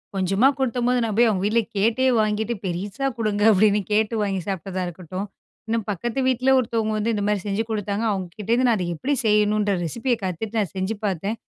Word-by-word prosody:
கொஞ்சமா 195 +6 +3
குடுத்தம்போது 250 -1 +1
நான் 220 -3 -2
போய் 240 0 +6
அவுங்க 190 -3 -1
வீட்ல 225 +3 +3 0.2
கேட்டே 230 +6 +2
வாங்கிட்டு 215 +2 0
பெருசா 195 +9 -3
கொடுங்க 210 -2 0
அப்பிடின்னு 210 +1 +4
கேட்டு 220 +2 +2
வாங்கிச் 195 -3 -2
சாப்ட்டதா 190 0 -3
இருக்கட்டும். 185 +3 -6 0.4
இன்னும் 225 -1 -1
பக்கத்து 225 +6 -2
வீட்ல 255 0 +2
ஒருத்தவங்க 225 -3 -1
வந்து 225 +2 0
இந்த 205 -2 -1
மாரி 210 -1 +1
செஞ்சு 205 +2 0
குடுத்தாங்க, 205 0 -2
அவுங்ககிட்ட 190 +1 -5
இருந்து 250 +2 +3
நான் 230 - +3
அது 180 - -2
எப்பிடி 275 - -1
செய்யணும்ன்ற 210 -1 +3
ரெசிபிய 235 - -1
கத்துட்டு 195 +5 -3
நான் 195 -7 -2
செஞ்சு 190 +3 -2
பார்த்தேன். 195 +3 -2
210 Hz, 180 wpm, -23 LUFS, 195-230 Hz, 0.4 s, போய்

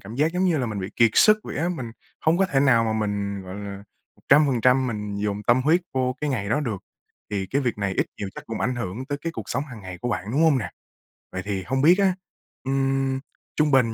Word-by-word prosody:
cảm 105 +4 -9
giác 150 +5 +1
giống 180 +1 +1
như 170 -5 +2
là 125 - -1
mình 105 -3 -4
bị 95 - -5
kiệt 115 -1 +5
sức 215 0 +6
vậy - - -7
á, 170 +3 0
mình 130 -10 -4 0.3
hông 160 +2 +2
có 195 - +3
thể 140 -7 +1
nào 120 -5 +4
mà 110 - 0
mình, 100 -2 -2
gọi 95 0 -8
là, 100 -1 -6 0.4
100% 130 -3 +4
mình 105 -3 -4
dồn 105 0 -2
tâm 120 +4 +3
huyết 165 +5 +4
vô 130 -1 +1
cái 150 -1 -1
ngày 100 -6 -2
đó 145 +7 +1
được. 110 -10 -3 0.5
Thì 95 -2 -2
cái 140 - 0
việc 120 -4 -1
này 100 -2 -1
ít - - +2
nhiều 100 - -3
chắc - - -9
cũng 115 - -5
ảnh 125 +1 0
hưởng 115 +2 -4
tới 145 -1 -3
cái 165 +3 -4
cuộc 110 - -5
sống 140 +4 -1
hàng 125 -7 -10
ngày 95 -2 -8
của 125 - -3
bạn, 105 -4 -2
đúng 145 +6 +2
hông 155 -5 +5
nè? 100 -7 -4 0.6
Vậy 95 - -4
thì 100 -2 -2
hông 130 +8 -1
biết 170 +5 +6
á, 195 -2 +4 0.5
ừm, 135 0 0 0.4
trung 150 -1 +2
bình 120 -4 +4
125 Hz, 255 wpm, -24 LUFS, 105-145 Hz, 0.6 s, sức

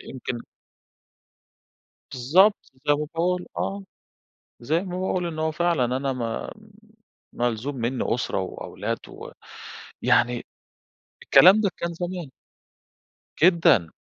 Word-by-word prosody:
يمكن 125 -2 -6 1.7
بالضبط، 175 - +4 0.3
زي 145 - +5
ما 150 +1 -2
باقول 180 +2 0
آه، 200 0 -3 0.8
زي 155 +8 0
ما 180 -2 -5
باقول 185 -1 -1
إن 165 -2 -5
هو 160 0 0
فعلًا 170 -4 +1
أنا 135 0 -1
ما 115 -3 -4 0.8
ملزوم 120 +3 -2
مني 120 +1 -1
أُسرة 125 - -2
وأولاد 95 - -5
و - - -10 0.7
يعني 120 0 +2 0.8
الكلام 195 +5 +7
ده 200 - +2
كان 170 0 -3
زمان. 175 -3 -5 1.1
جدًا، 165 - +5
155 Hz, 105 wpm, -24 LUFS, 125-180 Hz, 1.7 s, الكلام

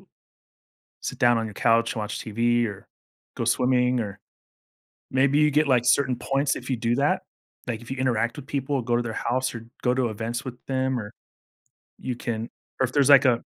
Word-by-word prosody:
l - - -24 1.0
sit 130 - -5
down 120 -3 +5
on 115 - -1
your 105 - -7
couch 115 +2 +2
and - - -4
watch 105 0 -4
TV, 120 +2 +1
or 100 -2 -7 0.5
go - - -1
swimming, 125 0 +2
or 100 -3 -4 1.0
maybe 135 +2 +3
you 150 0 +4
get, 150 0 +3
like, 125 -2 +3
certain 125 0 +3
points 135 +3 0
if - - -7
you 130 - +1
do 115 +1 0
that, 140 +1 +1 0.5
like, 115 -2 -2
if 120 - -13
you - - -4
interact 120 -2 0
with 145 -2 -9
people, 140 -1 -1
go 120 0 0
to 120 - +1
their 115 - -4
house, 130 +3 -1
or 115 - -7 0.2
go 125 - +2
to 130 -2 +1
events 115 +3 -4
with 125 -2 -6
them 130 -1 0
or, 105 -2 -7 0.9
you 125 - -3
can, 115 -1 -4 0.3
or 130 - +4
if 125 - -10
there's 140 -2 +3
like 140 -1 +8
a 120 -3 +3
125 Hz, 210 wpm, -25 LUFS, 115-130 Hz, 1.0 s, like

